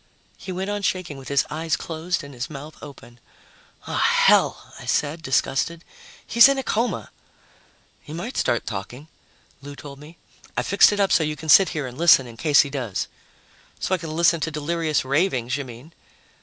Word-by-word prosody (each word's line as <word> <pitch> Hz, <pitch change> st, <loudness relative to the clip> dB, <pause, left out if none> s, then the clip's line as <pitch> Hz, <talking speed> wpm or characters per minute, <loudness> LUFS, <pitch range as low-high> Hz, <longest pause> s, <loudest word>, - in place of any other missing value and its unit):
He 190 Hz, -, -8 dB
went 190 Hz, +2 st, -3 dB
on 205 Hz, 0 st, -3 dB
shaking 185 Hz, -7 st, -2 dB
with 135 Hz, -, -12 dB
his 140 Hz, -1 st, +1 dB
eyes 160 Hz, +1 st, -1 dB
closed 165 Hz, +1 st, -4 dB
and 140 Hz, 0 st, -11 dB
his 125 Hz, +1 st, -5 dB
mouth 150 Hz, +1 st, -9 dB
open. 130 Hz, -4 st, -13 dB, 0.7 s
"Ah, -, -, -3 dB
hell!" -, -, +3 dB
I -, -, -11 dB
said, 150 Hz, +3 st, -1 dB
disgusted. 140 Hz, +3 st, -1 dB, 0.4 s
"He's 235 Hz, +3 st, +7 dB
in 275 Hz, -, +1 dB
a 270 Hz, -, -2 dB
coma." 235 Hz, +1 st, -2 dB, 0.9 s
"He -, -, -13 dB
might 175 Hz, +11 st, -6 dB
start 120 Hz, -, 0 dB
talking," 120 Hz, +9 st, -7 dB, 0.5 s
Lou 145 Hz, 0 st, -9 dB
told 140 Hz, -1 st, -11 dB
me. 155 Hz, +3 st, -14 dB, 0.4 s
"I -, -, +1 dB
fixed 200 Hz, +2 st, +5 dB
it 205 Hz, -, -2 dB
up 195 Hz, -1 st, +2 dB
so 165 Hz, -, +4 dB
you 150 Hz, 0 st, -2 dB
can 160 Hz, +1 st, -9 dB
sit 190 Hz, +5 st, +7 dB
here 150 Hz, -4 st, -3 dB
and 125 Hz, +2 st, -9 dB
listen 160 Hz, -6 st, +6 dB
in 120 Hz, -2 st, -11 dB
case 145 Hz, +4 st, +4 dB
he 140 Hz, -, -3 dB
does." 125 Hz, -8 st, -3 dB, 0.7 s
"So -, -, -2 dB
I 185 Hz, -, +1 dB
can 160 Hz, -1 st, -6 dB
listen 170 Hz, 0 st, +3 dB
to 160 Hz, -, -2 dB
delirious 155 Hz, -1 st, -1 dB
ravings, 135 Hz, -4 st, 0 dB
you 140 Hz, -1 st, -4 dB
mean." 125 Hz, +6 st, -12 dB
155 Hz, 190 wpm, -23 LUFS, 140-170 Hz, 0.9 s, He's